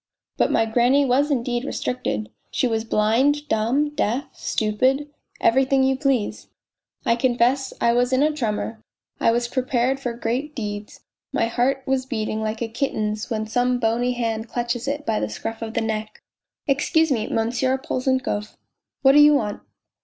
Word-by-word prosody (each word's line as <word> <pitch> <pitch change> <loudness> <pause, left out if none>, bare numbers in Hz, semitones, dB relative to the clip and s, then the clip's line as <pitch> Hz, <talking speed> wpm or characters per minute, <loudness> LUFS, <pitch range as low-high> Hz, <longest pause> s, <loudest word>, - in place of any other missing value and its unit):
But - - +2
my 225 - +3
granny 245 +5 +3
was 275 +3 +2
indeed 245 -3 -1
restricted: 110 - -3 0.2
she - - 0
was 225 -2 -1
blind, 250 +8 +2
dumb, 245 +7 +1
deaf, 260 -2 -1
stupid 255 +7 0 0.3
everything 265 +2 +3
you 265 0 +3
please.... 265 -6 -1 0.6
I 230 - +3
confess 250 +2 +1
I 235 - +3
was 245 +1 +2
in 260 +2 +3
a 305 - +3
tremor, 220 -4 -3 0.4
I - - +3
was 240 +1 +1
prepared 255 +1 0
for 245 -3 -3
great 245 +6 -3
deeds; 210 -3 -6 0.3
my - - +1
heart 250 +4 0
was 265 -1 0
beating 220 -3 -2
like 220 +1 -2
a - - -2
kitten's 215 -3 -2
when 220 -1 -2
some 245 +3 +1
bony 240 +1 +1
hand 225 -2 -2
clutches 240 +1 -2
it 290 +1 -2
by 220 -4 0
the 105 - -2
scruff 225 - -5
of 225 0 -5
the 230 - +1
neck." 220 -1 -4 0.2
" - - -61
Excuse 300 +3 +2
me, 225 -4 0
Monsieur 245 +4 0
Polzunkov." 260 -5 -2 0.2
" - - -65
What 270 - +7
do 290 - +6
you 295 0 +7
want 210 -7 -1
245 Hz, 170 wpm, -23 LUFS, 225-265 Hz, 0.6 s, What